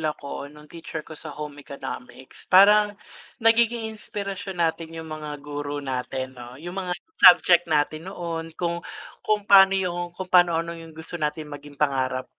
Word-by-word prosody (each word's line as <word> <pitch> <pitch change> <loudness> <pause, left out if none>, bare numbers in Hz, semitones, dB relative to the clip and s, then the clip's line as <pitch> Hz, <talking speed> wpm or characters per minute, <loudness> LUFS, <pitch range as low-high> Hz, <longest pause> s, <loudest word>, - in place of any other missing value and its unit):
ako 150 -2 -4
nung 150 0 -15
teacher 160 -2 -7
ko - - -12
sa 155 - -8
home 150 -1 -7
economics. 130 -2 -9
Parang 205 +2 +6 0.5
nagiging 230 0 +3
inspirasyon 195 -3 -5
natin 165 0 -3
yung 160 -1 -8
mga 150 -1 -6
guro 145 0 -4
natin 130 0 -4
'no, 120 +1 -10
yung 175 +5 -8
mga 180 -2 -2 0.2
subject 175 -1 +7
natin 155 +3 0
noon 165 -3 -5
kung 170 -1 -2 0.4
kung 210 -1 0
paano 195 -1 +7
yung 175 -2 -3
kung 185 -1 -6
paano 175 -2 +5
ano, 165 +1 -2
yung 165 -1 -11
gusto 160 +1 -5
natin 150 0 -3
maging 145 0 -10
pangarap 130 -3 0
165 Hz, 160 wpm, -24 LUFS, 145-185 Hz, 0.5 s, subject